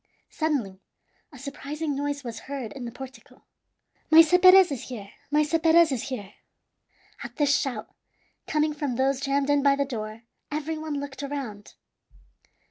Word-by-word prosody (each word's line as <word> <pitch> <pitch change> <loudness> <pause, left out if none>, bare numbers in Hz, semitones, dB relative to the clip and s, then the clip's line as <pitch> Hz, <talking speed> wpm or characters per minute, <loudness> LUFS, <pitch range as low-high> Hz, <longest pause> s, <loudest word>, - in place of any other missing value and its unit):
Suddenly 265 - -2 0.5
a 285 - -13
surprising 285 +2 -5
noise 285 0 -3
was 235 -2 -6
heard 270 -6 -5
in 260 -3 -7
the 235 - -6
portico. 255 0 -12 0.7
"Maese 325 +2 +7
Perez 370 -1 +8
is 265 -4 -4
here! 205 -5 -8 0.2
Maese 300 +1 +1
Perez 325 0 +5
is 265 +1 -3
here!" 210 -6 -6 0.9
At - - -8
this 285 -1 +3
shout, 255 -7 -2 0.6
coming 305 0 +1
from 290 -4 -3
those 265 +1 +1
jammed 280 0 +1
in 290 -1 +3
by 280 0 +4
the 280 0 0
door, 220 -3 -6 0.3
every 305 +2 -3
one 310 -2 -3
looked 280 -1 -7
around. 270 -8 -6
280 Hz, 150 wpm, -26 LUFS, 250-300 Hz, 0.9 s, Perez